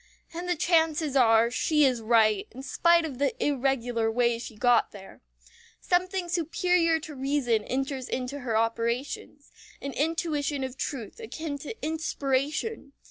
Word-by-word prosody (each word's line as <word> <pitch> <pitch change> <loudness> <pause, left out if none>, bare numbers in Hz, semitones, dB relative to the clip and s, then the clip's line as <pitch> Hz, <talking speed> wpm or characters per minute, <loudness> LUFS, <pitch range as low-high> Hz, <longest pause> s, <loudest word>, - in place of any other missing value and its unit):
And 350 +2 -5
the 355 - +2
chances 320 -3 +1
are 230 -2 +5
she 300 +3 +3
is 250 -3 +1
right, 220 -2 +3
in 260 +2 -10
spite 340 +3 +3
of 270 -5 -6
the 280 -2 +1
irregular 245 -5 0
way 235 0 +1
she 230 -1 -8
got 245 +1 +3
there. 195 -2 -13 0.6
Something 365 0 0
superior 340 0 +1
to 305 - -8
reason 265 -5 0
enters 270 0 -3
into 255 +3 -3
her 235 -4 -1
operations 235 +5 -2 0.3
an 280 -1 -5
intuition 300 -2 -1
of 260 -1 -5
truth 265 - -5
akin 320 -10 -5
to 310 +10 -7
inspiration. 295 +2 -2
275 Hz, 140 wpm, -27 LUFS, 245-320 Hz, 0.6 s, are